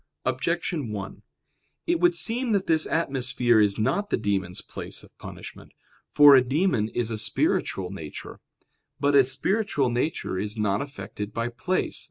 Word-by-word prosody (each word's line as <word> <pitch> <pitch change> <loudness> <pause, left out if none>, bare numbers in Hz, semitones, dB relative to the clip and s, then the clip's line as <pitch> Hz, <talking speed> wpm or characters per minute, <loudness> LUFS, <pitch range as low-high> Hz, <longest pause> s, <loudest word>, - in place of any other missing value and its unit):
Objection 145 0 -2
1: 100 -2 -6 0.6
It 340 0 +1
would 350 0 +3
seem 240 -4 +1
that 195 -2 +1
this 160 -1 +2
atmosphere 130 -6 +1
is 105 -2 +3
not 135 - 0
the - - +1
demons' 95 -4 -1
place - - -6
of - - -19
punishment. - - -10 0.4
For 145 -1 +8
a 130 - +7
demon 135 - 0
is 115 -1 -2
a 110 - -2
spiritual 95 -3 0
nature. 80 -6 -9 0.6
But 145 +1 +2
a 140 -1 +7
spiritual 140 - 0
nature 120 - -2
is 105 +2 -3
not 105 -1 0
affected 105 -6 -7
by 115 +1 -1
place. 185 +10 -2
130 Hz, 155 wpm, -25 LUFS, 105-165 Hz, 0.6 s, For